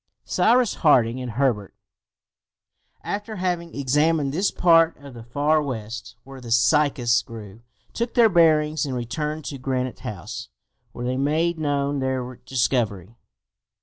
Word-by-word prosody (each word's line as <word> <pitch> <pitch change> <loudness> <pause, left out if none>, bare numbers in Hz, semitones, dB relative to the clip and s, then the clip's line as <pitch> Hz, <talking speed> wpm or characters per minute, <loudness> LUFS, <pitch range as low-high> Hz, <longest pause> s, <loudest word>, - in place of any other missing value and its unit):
Cyrus 240 -1 +3
Harding 130 -6 +3
and 125 -3 -5
Herbert, 115 -6 -1 1.3
after 210 +2 -4
having 175 -3 -3
examined 145 +1 +1
that 190 +5 +1
part 165 -1 +4
of 140 -2 -12
the 120 - -10
Far 145 +6 +1
West 110 -5 -6
where 135 -1 -11
the 120 - -9
cycas 120 0 +3
grew, 110 -1 -11 0.3
took 235 0 -3
their 235 -2 +6
bearings, 155 -4 +3
and 135 -4 -3
returned 150 +6 -4
to 140 - -6
Granite 130 -1 -3
House, 100 -6 -7 0.4
where 120 - -6
they 130 +1 -1
made 160 +5 0
known 145 -1 -1
their 130 -2 -3
discovery. 115 -6 -1
140 Hz, 135 wpm, -23 LUFS, 120-155 Hz, 1.3 s, their